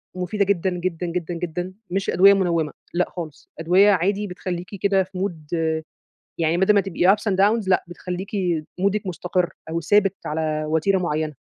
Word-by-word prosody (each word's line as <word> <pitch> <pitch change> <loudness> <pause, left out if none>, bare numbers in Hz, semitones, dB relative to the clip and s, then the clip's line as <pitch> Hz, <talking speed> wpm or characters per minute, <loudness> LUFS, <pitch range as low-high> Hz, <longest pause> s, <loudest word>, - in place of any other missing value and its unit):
مفيدة 185 +3 0
جدًا، 190 -2 +1
جدًا، 180 -1 -3
جدًا، 175 0 -3
جدًا، 175 +2 -4 0.2
مش 195 +2 -1
أدوية 195 +3 +7
منوِّمة، 170 -6 0 0.2
لأ 180 +1 +1
خالص، 160 -5 -8
أدوية 185 +5 +5
عادي 200 +3 +1
بتخلّيكِ 180 -1 -5
كده 195 -1 +3
في 185 0 -11
mood 175 -4 -3 0.8
يعني 165 +1 +2
بدل 190 +3 +4
ما 200 - +4
تبقي 190 0 +3
ups 210 0 -3
and - - +1
downs 205 +1 +3
لأ 185 - +3
بتخليكِ 180 +2 -6 0.5
مودِك 200 +1 0
مستقر 180 0 -1 0.2
أو 165 +1 -2
ثابت 195 +3 +3
على 155 0 -1
وتيرة 160 +5 +2
معينة. 155 -3 -2
180 Hz, 165 wpm, -23 LUFS, 170-195 Hz, 0.8 s, أدوية